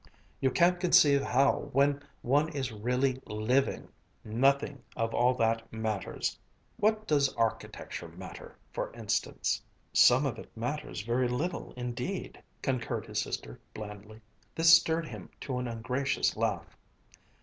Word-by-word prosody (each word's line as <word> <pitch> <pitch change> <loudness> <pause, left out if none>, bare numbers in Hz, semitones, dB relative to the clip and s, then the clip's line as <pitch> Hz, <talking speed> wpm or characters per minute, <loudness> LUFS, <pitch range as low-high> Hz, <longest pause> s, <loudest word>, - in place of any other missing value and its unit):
You 130 - +3
can't 175 +6 +3
conceive 145 -6 +5
how, 140 +2 +2
when 140 +1 +3 0.2
one 145 +5 +3
is 135 -4 -2
really 125 +4 0
living, 110 +6 0 0.4
nothing 135 +4 +1
of 115 0 -1
all 125 +1 +3
that 115 -1 0
matters. 110 -3 -3 0.4
What 215 +1 +2
does 140 -5 +3
architecture 115 -1 -2
matter, - - -10 0.2
for - - -3
instance?" - - -1 0.3
"Some 130 +4 +6
of 120 -5 -2
it - - -10
matters 120 -3 -3
very 120 +3 +1
little 155 +9 -2
indeed," 125 +10 -4 0.2
concurred 130 -4 -1
his - - -1
sister - - -5 0.2
blandly. 105 +1 -9 0.3
This 165 0 +7
stirred 165 0 +5
him - - -9
to 130 -3 -3
an 125 - -3
ungracious 125 +4 0
laugh. - - -2
130 Hz, 130 wpm, -30 LUFS, 115-145 Hz, 0.4 s, This